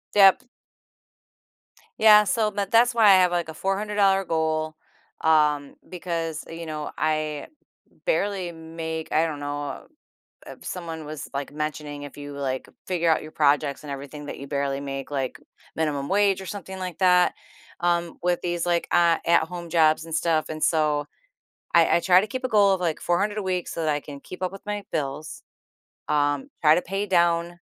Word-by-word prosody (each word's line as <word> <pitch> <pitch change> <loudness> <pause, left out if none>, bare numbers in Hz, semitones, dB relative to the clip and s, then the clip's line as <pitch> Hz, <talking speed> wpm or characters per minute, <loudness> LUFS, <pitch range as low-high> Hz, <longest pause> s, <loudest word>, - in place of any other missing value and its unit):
Yep. 205 +6 +6 1.5
Yeah, 210 -1 +8
so 215 +2 +1
m 200 - 0
that's 240 +2 +5
why 225 -2 +5
I - - +8
have 180 -1 +4
like 175 -2 -1
a - - -6
$400 195 +1 +1
goal, 160 -2 -1 0.5
um, 150 -3 +2
because, 165 -3 -4
uh, - - -8
you 165 0 -7
know, 155 -1 -5
I 155 -1 -1 0.6
barely 200 - 0
make, 160 -1 -6
I 160 +2 +3
don't 155 -3 -4
know, 145 0 -5 0.6
if - - -11
someone 165 -3 -6
was 150 0 -7
like 140 0 -4
mentioning 150 -1 -4
if 145 - -10
you 145 0 -8
like 135 -2 -3 0.2
figure 170 -2 +1
out 160 - +2
your 155 - -10
projects 145 -2 +2
and 150 - -8
everything 140 +2 -7
that - - -6
you 140 - -8
barely 140 -1 -2
make, 135 -1 -5
like, 135 -3 -3 0.4
minimum 145 -3 -1
wage 200 -1 +2
or - - -9
something 190 -1 -7
like 185 -2 -5
that, 180 -1 +4 0.5
um, 175 -1 0
with 175 0 +1
these, 175 -1 -2
like, 175 -1 0
uh, 170 -1 +4
at 170 -1 +4
home 170 0 -8
jobs 160 -1 +3
and 165 -1 -6
stuff, 160 -1 +1
and 155 0 -5
so 150 -2 +2 0.7
I 170 0 +5
I - - +1
try 180 +1 +5
to 210 - -3
keep 255 +5 -5
a - - +2
goal 205 -4 +4
of 190 - -1
like 165 -3 -1
400 200 +5 0
a 210 - -2
week 185 -2 -2
so 165 - -4
that 155 - 0
I 145 - -1
can 145 -1 -10
keep 185 - -10
up 185 - -1
with 195 - -11
my 205 0 -3
bills. 150 0 -4 0.7
Um, 145 - +1
try 155 -1 +7
to 180 - +1
pay 195 +3 -3
down, 170 -2 +1
165 Hz, 185 wpm, -25 LUFS, 150-185 Hz, 1.5 s, Yeah